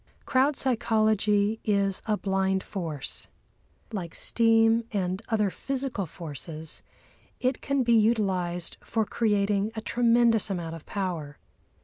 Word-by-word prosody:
Crowd 270 +3 +3
psychology 215 -4 +1
is 200 -2 +1
a 210 -1 +1
blind 190 -1 0
force. 160 -7 -5 0.7
Like 175 -6 -4
steam 225 0 +4
and 185 -1 -1
other 210 -3 +1
physical 260 -8 -3
forces, 160 -1 -8 0.6
it 255 0 0
can 275 -2 +1
be 235 -1 +3
utilised 190 -6 +1
for 220 -2 0
creating 205 -1 +1
a 220 - -3
tremendous 235 -2 +3
amount 170 -4 -3
of 165 - -12
power. 170 -7 -4
205 Hz, 115 wpm, -27 LUFS, 185-230 Hz, 0.7 s, steam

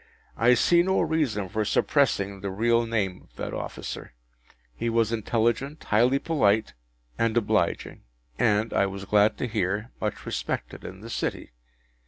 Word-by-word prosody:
I 120 +3 +5
see 170 +8 +4
no 190 +2 +2
reason 150 - 0
for 110 +4 -1
suppressing 100 -5 +1
the 100 - -3
real 115 +4 +2
name 100 -5 -1
of - - -32
that - - -5
officer. - - -6 0.6
He 115 - -2
was 115 -1 +2
intelligent, 120 +6 0
highly 120 +5 +3
polite, 110 - +1 0.5
and 115 0 +1
obliging, 115 - 0 0.4
and 105 +2 +2
(I 100 - +3
was 95 0 -6
glad 105 +1 +3
to 125 - -2
hear) 105 +1 -2
much 105 -1 -3
respected - - -4
in 95 +1 -9
the 115 - -9
City. - - -3
110 Hz, 150 wpm, -26 LUFS, 100-120 Hz, 0.6 s, I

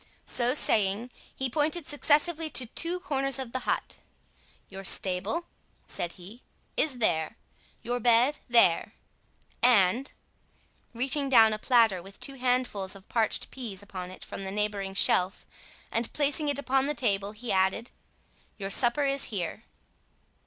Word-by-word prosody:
So 245 +2 +2
saying, 215 -1 +2 0.2
he 265 - -1
pointed 305 +5 -1
successively 305 +2 +1
to 260 -3 +1
two 335 +9 -2
corners 275 -2 0
of 260 -3 -5
the 260 - -4
hut. - - -2 0.7
"Your 195 0 -9
stable," 190 - 0 0.4
said 175 - -2
he, 200 +7 -12 0.3
"is 285 -5 +1
there—your 220 +5 -2
bed 240 +5 +3
there; 230 -8 +4 0.7
and," 235 +1 +3 0.8
reaching 270 +4 -1
down 225 -4 +6
a 215 - -3
platter 225 -7 +3
with 195 +2 -14
two 275 - -4
handfuls 250 -7 -1
of 195 -1 -15
parched 225 -2 -1
pease 215 -7 -6
upon 185 -3 -7
it 185 - -10
from - - -7
the 190 - -4
neighbouring 200 -1 -2
shelf, 185 -1 +2 0.5
and 230 0 -1
placing 295 +1 0
it 285 - -1
upon 270 -1 0
the 295 - -1
table, 205 -5 -1
he 220 +2 -5
added, 190 +5 +1 0.7
"your 195 -2 -5
supper 245 +6 +2
is 275 0 -1
here." 200 0 -4
235 Hz, 140 wpm, -28 LUFS, 195-270 Hz, 0.8 s, down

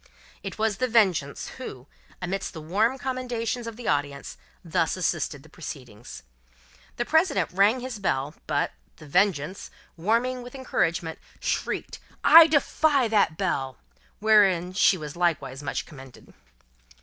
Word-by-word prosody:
It - - -7
was 220 -2 0
The 255 - 0
Vengeance 190 - +1
who, 130 - -8 0.4
amidst 190 +2 -3
the 165 - -7
warm 210 +11 +1
commendations 245 -2 -3
of 230 - -6
the 240 0 -8
audience, 145 -1 -2 0.3
thus 165 +1 0
assisted 160 -5 -2
the - - -16
proceedings. 125 -8 -9 0.7
The 240 - -1
President 320 - +2
rang 205 +7 +3
his 250 -4 -6
bell; 145 -6 -1
but, 145 -2 0 0.2
The 155 - -14
Vengeance, 180 +1 0 0.3
warming 235 +8 0
with 245 +2 -10
encouragement, 170 -10 -1 0.2
shrieked, - - -3 0.2
"I 330 0 +10
defy 285 -3 +2
that 200 -7 +2
bell!" 135 -2 -2 0.4
wherein 195 -5 +4
she 190 0 +4
was 150 -3 -7
likewise 145 -6 -1
much 145 - -3
commended. 135 -5 -14
190 Hz, 135 wpm, -26 LUFS, 150-235 Hz, 0.7 s, I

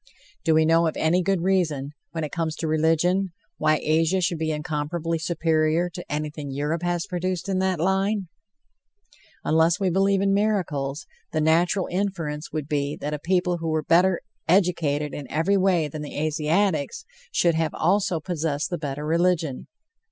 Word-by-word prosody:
Do 160 -3 +3
we 160 0 +4
know 165 +1 +4
of 160 - -3
any 170 +3 +2
good 190 -1 0
reason, 160 -7 0 0.2
when 165 -1 -4
it 150 - -4
comes 165 -2 -2
to 165 - -3
religion, 165 +4 +2 0.3
why 155 0 +3
Asia 165 +4 +2
should 170 -2 0
be 160 0 -1
incomparably 155 +2 -2
superior 165 +1 +1
to 175 +1 -9
anything 150 -1 -4
Europe 150 +4 -2
has 175 -1 -1
produced 185 -1 -3
in 190 -1 0
that 190 -3 0
line? 195 +3 +1 1.2
Unless 160 +1 +3
we 190 -2 +1
believe 195 +2 +3
in 195 0 +2
miracles, 170 -9 0 0.3
the 155 - +1
natural 170 +4 +2
inference 175 -6 -3
would 155 -3 -3
be 145 -1 -1
that 150 +1 -4
a 150 - -3
people 180 +2 +1
who 165 - -4
were 155 -1 0
better 180 +3 +3 0.3
educated 160 -5 +2
in 140 -3 -7
every 165 +6 +1
way 185 -5 +2
than 150 +1 -7
the 150 - -7
Asiatics 155 - 0 0.3
should 170 - +3
have 160 -1 -1
also 190 -4 +1
possessed 155 -3 -2
the 175 - -2
better 145 0 -4
religion. 165 -3 0
165 Hz, 165 wpm, -24 LUFS, 155-180 Hz, 1.2 s, we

